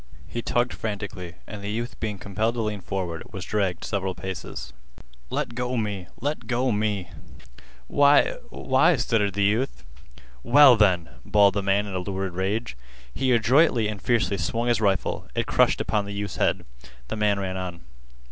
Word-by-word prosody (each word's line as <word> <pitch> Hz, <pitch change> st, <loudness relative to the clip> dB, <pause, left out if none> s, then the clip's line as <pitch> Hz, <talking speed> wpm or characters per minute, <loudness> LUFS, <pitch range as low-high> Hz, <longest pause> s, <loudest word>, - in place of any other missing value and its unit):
He 120 Hz, -, -4 dB
tugged 120 Hz, +1 st, 0 dB
frantically, 100 Hz, -5 st, -5 dB
and 105 Hz, -2 st, -8 dB
the 100 Hz, -, -3 dB
youth 115 Hz, +3 st, -4 dB
being 105 Hz, -2 st, -3 dB
compelled 105 Hz, +5 st, -1 dB
to 120 Hz, -, -1 dB
lean 105 Hz, -2 st, -3 dB
forward 90 Hz, -4 st, -4 dB
was 95 Hz, -4 st, -6 dB
dragged 95 Hz, -5 st, -1 dB
several 95 Hz, -3 st, -2 dB
paces. 95 Hz, -9 st, -6 dB, 0.6 s
"Let -, -, -2 dB
go 125 Hz, +1 st, -2 dB
me! 100 Hz, -5 st, -3 dB
Let 145 Hz, +5 st, -3 dB
go 125 Hz, +1 st, +1 dB
me!" 105 Hz, -4 st, -1 dB, 0.7 s
"Why—why—" 145 Hz, -, +3 dB
stuttered 105 Hz, -4 st, 0 dB
the 100 Hz, -, +1 dB
youth. 105 Hz, -, 0 dB, 0.6 s
"Well, 135 Hz, -, +7 dB
then!" 90 Hz, -7 st, +3 dB
bawled 100 Hz, +3 st, +4 dB
the 100 Hz, -, 0 dB
man 100 Hz, +1 st, +1 dB
in 100 Hz, -, -6 dB
a 95 Hz, -, -1 dB
lurid 95 Hz, 0 st, -3 dB
rage. 100 Hz, -, -2 dB, 0.4 s
He 130 Hz, -1 st, 0 dB
adroitly 120 Hz, 0 st, +4 dB
and 105 Hz, -2 st, -5 dB
fiercely 115 Hz, -4 st, +1 dB
swung 115 Hz, +3 st, -1 dB
his 115 Hz, -2 st, +2 dB
rifle. 100 Hz, -3 st, 0 dB
It -, -, 0 dB
crushed -, -, +3 dB
upon 105 Hz, -2 st, 0 dB
the 100 Hz, -, -6 dB
youth's 100 Hz, -1 st, -4 dB
head. -, -, +1 dB, 0.4 s
The -, -, -2 dB
man 105 Hz, -2 st, +2 dB
ran 95 Hz, -1 st, -3 dB
on. 90 Hz, -2 st, -5 dB
105 Hz, 165 wpm, -25 LUFS, 95-115 Hz, 0.7 s, Well